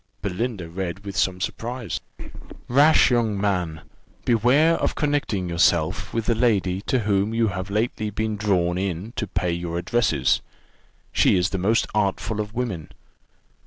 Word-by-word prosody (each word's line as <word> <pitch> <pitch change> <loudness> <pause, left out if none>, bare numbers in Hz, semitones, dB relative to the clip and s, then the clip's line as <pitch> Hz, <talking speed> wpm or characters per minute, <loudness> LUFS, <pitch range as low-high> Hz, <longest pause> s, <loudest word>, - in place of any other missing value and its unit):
Belinda 100 -1 -3
read 95 +3 -5
with 100 -2 -6
some 90 +1 +1
surprise: 120 +4 -4 0.7
"Rash 145 +3 +5
young 115 -4 +1
man! 90 -6 -1 0.4
beware 125 +8 +4
of - - -1
connecting 145 -11 -1
yourself 85 -2 +1
with 115 -1 -2
the 115 - +2
lady 100 -5 +1
to 130 -3 +2
whom 105 +1 +1
you 115 -1 +2
have 95 -1 -5
lately 110 +1 -1
been 110 +1 -2
drawn 90 -4 +1
in 95 +3 -3
to 105 - -2
pay 90 -1 -1
your 85 0 -3
addresses: 115 +7 +1 0.7
she - - +4
is 90 +1 +1
the 95 - -2
most 110 +5 +2
artful 105 +1 0
of 105 0 -6
women. 110 -11 -3
100 Hz, 150 wpm, -23 LUFS, 90-115 Hz, 0.7 s, Rash